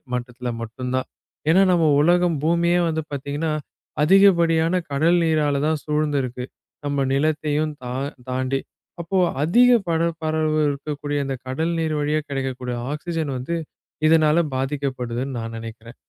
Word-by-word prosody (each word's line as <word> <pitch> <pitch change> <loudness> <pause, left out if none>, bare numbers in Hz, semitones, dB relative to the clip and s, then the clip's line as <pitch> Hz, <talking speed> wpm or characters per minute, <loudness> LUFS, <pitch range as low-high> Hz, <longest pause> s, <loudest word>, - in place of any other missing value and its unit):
மட்டத்துல 125 0 -5
மட்டும்தான். 125 +3 -3 0.4
ஏன்னா 180 +4 +6
நம்ம 170 -2 +3 0.2
உலகம் 175 0 +3
பூமியே 170 +1 +3
வந்து 160 0 -1
பாத்தீங்கன்னா, 145 +3 -3 0.5
அதிகப்படியான 170 -1 +4
கடல் 165 +5 +3
நீரால 150 -3 +1
தான் 155 -2 0
சூழ்ந்திருக்கு. 145 -5 -1 0.4
நம்ம 140 -1 0
நிலத்தையும் 155 +1 0
தா 125 0 -4 0.4
தாண்டி. 130 +1 -1 0.4
அப்போ 170 +3 -2 0.3
அதிக 240 +11 +5 0.2
பரப்பளவு 160 -2 0
இருக்கக்கூடிய 145 0 -3
அந்தக் 135 -2 -5
கடல் 160 +6 -1
நீர் 160 -1 0
வழியா 150 +1 +1
கிடைக்கக்கூடிய 130 -2 -3 0.2
ஆக்ஸிஜன் 160 -1 -3
வந்து, 130 +7 -3 0.5
இதனால 155 0 +4 0.2
பாதிக்கப்படுதுன்னு 130 -2 -3
நான் 115 0 -6
நெனைக்கிறேன். 115 +1 -9
150 Hz, 120 wpm, -22 LUFS, 130-165 Hz, 0.5 s, ஏன்னா